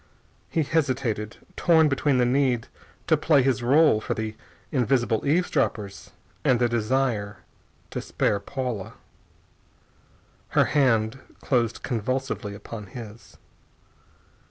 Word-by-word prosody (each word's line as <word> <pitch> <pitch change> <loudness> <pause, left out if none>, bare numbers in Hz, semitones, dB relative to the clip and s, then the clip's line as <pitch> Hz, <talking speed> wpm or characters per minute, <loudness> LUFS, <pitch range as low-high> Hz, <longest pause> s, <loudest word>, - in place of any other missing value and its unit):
He 160 - +1
hesitated, 130 -8 -1 0.2
torn 160 -2 +4
between 140 -1 +1
the 125 - +3
need 125 -2 +1 0.4
to - - +4
play 145 -5 +3
his 130 -1 +1
rôle 135 -2 +4
for - - -2
the 110 -1 -4 0.4
invisible 120 -3 +1
eavesdroppers 135 - 0 0.3
and 125 - +4
the 120 - +3
desire 115 -3 0 0.5
to - - -3
spare 100 - 0
Paula. 120 -2 -4 1.6
Her - - +6
hand 125 -4 +2 0.2
closed 120 -4 0
convulsively 125 -3 -2
upon 105 0 -8
his. 110 +1 -11
125 Hz, 110 wpm, -25 LUFS, 110-135 Hz, 1.6 s, Her